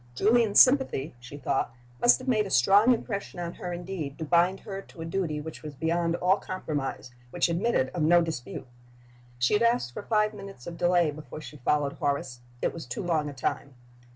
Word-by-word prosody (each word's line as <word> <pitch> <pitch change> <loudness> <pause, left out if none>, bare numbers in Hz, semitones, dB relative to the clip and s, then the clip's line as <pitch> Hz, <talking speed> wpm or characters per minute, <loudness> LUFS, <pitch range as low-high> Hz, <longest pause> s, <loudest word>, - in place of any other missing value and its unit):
Julian's 220 - +4
sympathy 255 - +4
(she 125 +4 -10
thought) 135 -3 -1 0.3
must 240 - +6
have 255 - -11
made 215 -5 +2
a - - -7
strong 200 - +5
impression 205 -6 -2
on 170 0 -4
her 180 - -6
indeed 175 -5 -5
to 160 - -4
blind 175 +4 +2
her 195 -2 -6
to 165 - -13
a - - -4
duty 165 -3 -2
which 160 +1 -8
was 150 -2 -8
beyond 165 +3 0
all 180 +2 +3
compromise, 145 -8 -4 0.2
which 175 +5 +1
admitted 170 - +1
of 175 - -4
no 170 +3 +5
dispute! 160 -8 -5 0.7
She 120 +8 +2
had 210 - +3
asked 235 - +2
for - - -5
five 210 -1 +1
minutes 195 -10 -10
of 170 - -6
delay 175 -2 +2
before 155 +1 -9
she 150 - -10
followed 145 +2 0
Horace. 140 -3 -2 0.2
It - - +1
was 165 - -8
too 215 - -4
long 160 -4 0
a - - -8
time. 135 0 -3
170 Hz, 200 wpm, -27 LUFS, 145-195 Hz, 0.7 s, must